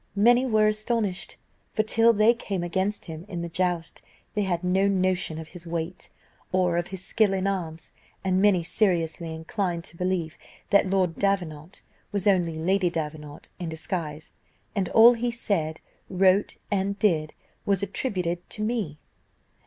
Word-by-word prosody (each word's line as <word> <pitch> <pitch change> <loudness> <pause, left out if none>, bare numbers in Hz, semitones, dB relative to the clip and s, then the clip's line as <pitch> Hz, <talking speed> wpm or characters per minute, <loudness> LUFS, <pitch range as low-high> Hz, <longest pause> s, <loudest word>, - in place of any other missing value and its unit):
Many 240 +5 +5
were 215 -3 +3
astonished, 215 -2 -1 0.4
for, 215 - +3
till 225 +1 +4
they 220 +1 +5
came 200 -6 -4
against 190 +4 -1
him 160 -1 -7
in 175 -4 -4
the 170 - -4
joust, 175 -1 -1 0.3
they 210 - 0
had 180 -3 -1
no 190 +2 +2
notion 185 -4 +1
of 160 0 -8
his 175 -1 -9
weight, 170 +2 -4 0.4
or 180 -2 +2
of 175 0 -1
his 190 -1 -4
skill 215 -3 +3
in 190 0 -1
arms; 165 -5 -3 0.3
and 190 -1 +2
many 195 -4 +4
seriously 170 -3 +1
inclined 170 +2 -3
to 170 - -12
believe 180 -3 -2 0.3
that 200 -1 +5
Lord 185 -3 +1
Davenant 180 -4 -2 0.3
was 200 -2 -2
only 175 -5 +2
Lady 185 +3 +2
Davenant 150 -3 -5
in 175 -2 -4
disguise, 160 -1 -4 0.4
and 195 -3 0
all 230 +2 +8
he 240 +1 -1
said, 170 -9 -1 0.3
wrote, 190 +1 +3
and 200 0 0
did, 160 -8 +1 0.3
was 200 -1 +1
attributed 180 -5 -2
to 215 - -4
me. 215 -10 -2
185 Hz, 155 wpm, -26 LUFS, 170-200 Hz, 0.4 s, all